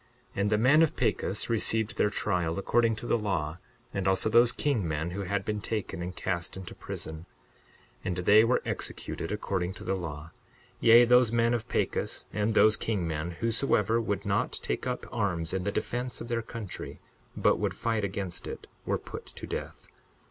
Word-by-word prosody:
62:9 -, -, 0 dB
And 100 Hz, -, +2 dB
the 105 Hz, -, +3 dB
men 130 Hz, +8 st, +5 dB
of 165 Hz, -, +2 dB
Pachus -, -, 0 dB
received 115 Hz, 0 st, +1 dB
their 105 Hz, -, +4 dB
trial, 90 Hz, -5 st, -1 dB
according 115 Hz, +3 st, +2 dB
to 110 Hz, -, -7 dB
the 120 Hz, -, +2 dB
law, 90 Hz, -6 st, -1 dB, 0.4 s
and 100 Hz, -1 st, -1 dB
also 95 Hz, +3 st, +2 dB
those 120 Hz, +1 st, +6 dB
king 120 Hz, -, 0 dB
men 80 Hz, +2 st, -2 dB
who 100 Hz, +3 st, -4 dB
had 100 Hz, +1 st, -1 dB
been 105 Hz, -1 st, -2 dB
taken 105 Hz, -5 st, -3 dB
and 90 Hz, +1 st, -5 dB
cast 85 Hz, -1 st, -3 dB
into 95 Hz, -2 st, -8 dB
prison; 80 Hz, +2 st, -7 dB, 0.8 s
and 90 Hz, -, -1 dB
they 105 Hz, +5 st, +6 dB
were 120 Hz, +2 st, +2 dB
executed 80 Hz, -, -3 dB
according 95 Hz, -3 st, -2 dB
to -, -, -10 dB
the 95 Hz, -, -1 dB
law; 80 Hz, -4 st, -5 dB, 0.5 s
yea, 115 Hz, +1 st, +8 dB
those 125 Hz, -1 st, +5 dB
men 115 Hz, 0 st, +3 dB
of 115 Hz, -2 st, -2 dB
Pachus -, -, -1 dB
and 105 Hz, +1 st, 0 dB
those 110 Hz, 0 st, +6 dB
king 100 Hz, -7 st, -1 dB
men, 80 Hz, +1 st, -2 dB
whosoever 115 Hz, -1 st, +2 dB
would 100 Hz, -2 st, -2 dB
not 100 Hz, 0 st, 0 dB
take -, -, -2 dB
up 125 Hz, 0 st, -3 dB
arms 90 Hz, -7 st, -1 dB
in 95 Hz, -1 st, -1 dB
the 100 Hz, -, +1 dB
defence 125 Hz, +4 st, -2 dB
of 115 Hz, -, -7 dB
their 115 Hz, -1 st, 0 dB
country, 110 Hz, -4 st, -7 dB, 0.4 s
but -, -, +3 dB
would -, -, -1 dB
fight 115 Hz, -2 st, -1 dB
against 95 Hz, -2 st, -3 dB
it, -, -, -7 dB, 0.2 s
were -, -, +1 dB
put -, -, -9 dB
to -, -, -8 dB
death. -, -, -6 dB
105 Hz, 190 wpm, -29 LUFS, 90-115 Hz, 0.8 s, yea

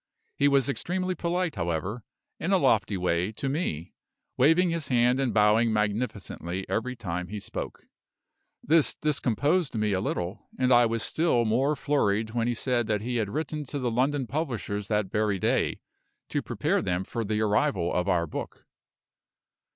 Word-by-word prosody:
He 140 Hz, -, +3 dB
was 140 Hz, -3 st, +3 dB
extremely 185 Hz, +6 st, -2 dB
polite, 175 Hz, -1 st, -1 dB
however, 85 Hz, +7 st, -2 dB, 0.4 s
in 170 Hz, -, -1 dB
a 195 Hz, -, +5 dB
lofty 110 Hz, -, +2 dB
way, 90 Hz, +2 st, 0 dB
to 135 Hz, -, -4 dB
me, 135 Hz, -, -2 dB, 0.4 s
waving 165 Hz, +6 st, +4 dB
his 165 Hz, -3 st, -1 dB
hand 125 Hz, +1 st, +3 dB
and 135 Hz, -3 st, +1 dB
bowing 110 Hz, +2 st, +4 dB
magnificently 105 Hz, -4 st, -2 dB
every 125 Hz, +3 st, -2 dB
time 90 Hz, -6 st, -4 dB
he 105 Hz, +3 st, -5 dB
spoke. -, -, -6 dB, 0.8 s
This 160 Hz, 0 st, +3 dB
discomposed 145 Hz, -, +1 dB
me 105 Hz, -2 st, +1 dB
a 95 Hz, -, 0 dB
little; 90 Hz, +4 st, -3 dB
and 130 Hz, 0 st, +3 dB
I 120 Hz, -1 st, +6 dB
was 115 Hz, 0 st, -2 dB
still 155 Hz, -8 st, +1 dB
more 130 Hz, +7 st, +2 dB
flurried 110 Hz, -8 st, 0 dB
when 115 Hz, 0 st, 0 dB
he 120 Hz, -, 0 dB
said 120 Hz, -1 st, +1 dB
that 105 Hz, -2 st, 0 dB
he 120 Hz, +1 st, -2 dB
had 110 Hz, -3 st, -1 dB
written 155 Hz, +3 st, -3 dB
to 145 Hz, -, -4 dB
the 125 Hz, -3 st, -1 dB
London 135 Hz, +3 st, +1 dB
publishers 115 Hz, -8 st, -3 dB
that 105 Hz, -3 st, 0 dB
very 105 Hz, -2 st, +1 dB
day, -, -, 0 dB, 0.5 s
to -, -, -1 dB
prepare -, -, 0 dB
them 90 Hz, +1 st, -1 dB
for 115 Hz, +4 st, -4 dB
the 105 Hz, 0 st, -1 dB
arrival 100 Hz, -4 st, +1 dB
of 90 Hz, +2 st, 0 dB
our 85 Hz, -2 st, +2 dB
book. 75 Hz, -, -7 dB
115 Hz, 165 wpm, -27 LUFS, 100-140 Hz, 0.8 s, I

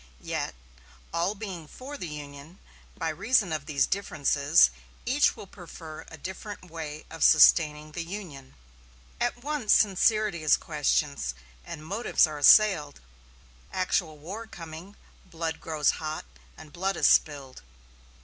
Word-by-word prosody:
Yet, -, -, -3 dB, 0.6 s
all 175 Hz, +5 st, 0 dB
being 190 Hz, -7 st, -7 dB
for 265 Hz, -, -9 dB
the 180 Hz, -, -6 dB
Union, 145 Hz, +2 st, -10 dB, 0.4 s
by 165 Hz, -2 st, -2 dB
reason 195 Hz, +2 st, +1 dB
of 150 Hz, -2 st, -4 dB
these 140 Hz, -4 st, +2 dB
differences 150 Hz, -5 st, +3 dB, 0.3 s
each 270 Hz, +5 st, +3 dB
will -, -, -10 dB
prefer 165 Hz, -4 st, -11 dB
a 160 Hz, -, -11 dB
different 190 Hz, +2 st, -8 dB
way 155 Hz, -2 st, -7 dB
of 160 Hz, -, -3 dB
sustaining 155 Hz, -1 st, +5 dB
the 170 Hz, -, -5 dB
Union. 165 Hz, -, -9 dB, 0.6 s
At 240 Hz, 0 st, -2 dB
once 290 Hz, -7 st, +1 dB
sincerity 210 Hz, -2 st, +2 dB
is 155 Hz, -, +4 dB
questioned, 65 Hz, +1 st, -1 dB, 0.3 s
and 155 Hz, -, -9 dB
motives 205 Hz, +5 st, +2 dB
are 155 Hz, -2 st, -6 dB
assailed. 150 Hz, -3 st, +5 dB, 0.7 s
Actual 180 Hz, -4 st, -1 dB
war 195 Hz, +10 st, -8 dB
coming, 170 Hz, +1 st, -10 dB, 0.3 s
blood 165 Hz, -3 st, -5 dB
grows 155 Hz, -3 st, +1 dB
hot, 155 Hz, 0 st, -5 dB, 0.3 s
and 155 Hz, -2 st, -13 dB
blood 190 Hz, +1 st, -2 dB
is -, -, +1 dB
spilled. 140 Hz, -4 st, +2 dB
165 Hz, 130 wpm, -27 LUFS, 150-195 Hz, 0.7 s, sustaining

